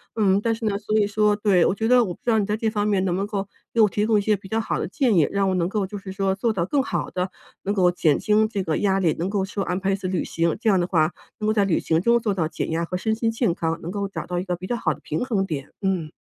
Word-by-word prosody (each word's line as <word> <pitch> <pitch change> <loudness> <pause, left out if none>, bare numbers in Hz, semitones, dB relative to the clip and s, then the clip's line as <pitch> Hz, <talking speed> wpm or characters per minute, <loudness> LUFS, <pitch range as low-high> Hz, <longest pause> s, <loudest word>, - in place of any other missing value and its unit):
嗯， 200 -2 +3
但 225 +1 +1
是 225 0 -6
呢 200 -1 0
所 215 +1 0
以 205 - +3
说 210 0 +2
对， 205 -4 +3
我 190 - +1
觉 225 +2 -1
得 250 -1 +5
我 185 - -4
不 - - -32
知 240 - +1
道 220 - +3
你 205 - +1
在 210 0 0
这 225 0 0
方 210 -1 0
面 195 -2 +1
能 180 - 0
不 - - -1
能 200 - -1
够 200 -2 -3 0.3
给 235 - 0
我 210 - +7
提 205 +2 -1
供 220 -1 +4
一 205 - +2
些 210 +1 +2
比 195 -1 -11
较 220 +3 -1
好 225 - -2
的 - - -2
建 245 - +1
议？ 155 -4 +4
让 200 -1 +1
我 - - +1
能 175 -1 0
够 205 -1 -1
就 205 +2 -7
是 190 -1 -8
说 195 0 0
做 225 +4 0
到 170 -3 0
更 280 +6 +1
好 280 - -2
地 180 +1 -2 0.3
能 200 +1 -1
够 180 -3 +4
减 160 -4 +2
轻 215 0 +3
这 205 -3 -3
个 160 -3 -1
压 195 -2 +2
力， 165 -5 +2
能 175 +3 -1
够 200 -1 0
说 200 +1 -4
安 180 - -1
排 195 0 0
一 - - +2
次 195 -1 -5
旅 185 -1 -1
行。 165 -1 -1
这 225 - +2
样 195 -3 +4
的 175 - 0
话 160 -2 +2 0.3
能 215 - -3
够 215 - +3
在 205 -2 +3
旅 175 - +1
行 160 0 +1
中 235 +4 +4
做 220 -3 -1
到 170 -5 0
减 160 - -4
压 165 +1 0
和 180 - -5
身 220 +4 0
心 230 0 0
健 225 -5 +1
康， 165 -1 -2
能 170 - -5
够 200 0 -2
找 195 - -6
到 180 -1 -2
一 180 - -2
个 180 -2 -1
比 185 +1 -8
较 240 - -1
好 - - 0
的 - - -14
平 155 +11 -2
衡 210 -6 0
点， 145 -6 -5
嗯。 185 -5 -1
195 Hz, 360 characters per minute, -23 LUFS, 180-215 Hz, 0.3 s, 我